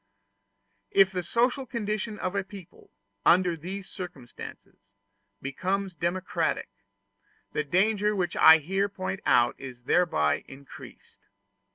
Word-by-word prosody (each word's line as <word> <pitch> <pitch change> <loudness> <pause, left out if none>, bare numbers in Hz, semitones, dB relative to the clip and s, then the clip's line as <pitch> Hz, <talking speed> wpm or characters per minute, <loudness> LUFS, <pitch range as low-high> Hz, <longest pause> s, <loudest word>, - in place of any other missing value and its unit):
If 195 -1 +5
the 180 -1 -2
social 245 +8 0
condition 215 -2 -3
of 185 - -3
a 200 -1 0
people, 190 -2 -13 0.3
under 175 0 +4
these 185 +4 -7
circumstances, 120 - -10 0.5
becomes 190 +8 -2
democratic, 175 +2 -1 0.8
the 150 - 0
danger 205 +7 +2
which 180 -2 -1
I 160 0 +9
here 195 +6 -1
point 195 0 -4
out 120 0 +4
is 125 -2 -9
thereby 100 - +2
increased. 135 +1 -13
185 Hz, 110 wpm, -27 LUFS, 155-200 Hz, 0.8 s, I